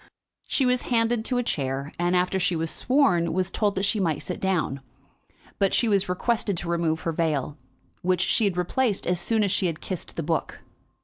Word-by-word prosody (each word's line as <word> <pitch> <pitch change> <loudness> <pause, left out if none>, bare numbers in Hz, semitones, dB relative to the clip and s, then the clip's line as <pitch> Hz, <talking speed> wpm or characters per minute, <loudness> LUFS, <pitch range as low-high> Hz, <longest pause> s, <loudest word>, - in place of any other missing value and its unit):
She 270 - +1
was 250 0 +2
handed 230 -1 +2
to 250 - 0
a 245 - +1
chair, 140 - -2
and, 175 +1 +1
after 180 +1 +1
she 180 -1 +1
was 160 0 -1
sworn, 185 - +2
was 185 +1 0
told 205 -2 0
that 195 - 0
she 215 +2 +1
might 165 -6 0
sit 180 - -4
down. 170 -8 -1 0.8
But 195 -1 +2
she 235 - +2
was 200 -3 +2
requested 205 +1 0
to 170 - -4
remove 165 -2 0
her 165 - -1
veil, 155 -3 -1 0.5
which 180 0 +1
she 220 +4 +3
had 190 -3 0
replaced 205 +4 0
as 180 -1 +1
soon 220 +4 +1
as 200 - +1
she 185 - +2
had 165 -2 -3
kissed 185 -3 -6
the 165 - -3
book. 160 +1 -2
180 Hz, 205 wpm, -25 LUFS, 165-210 Hz, 0.8 s, she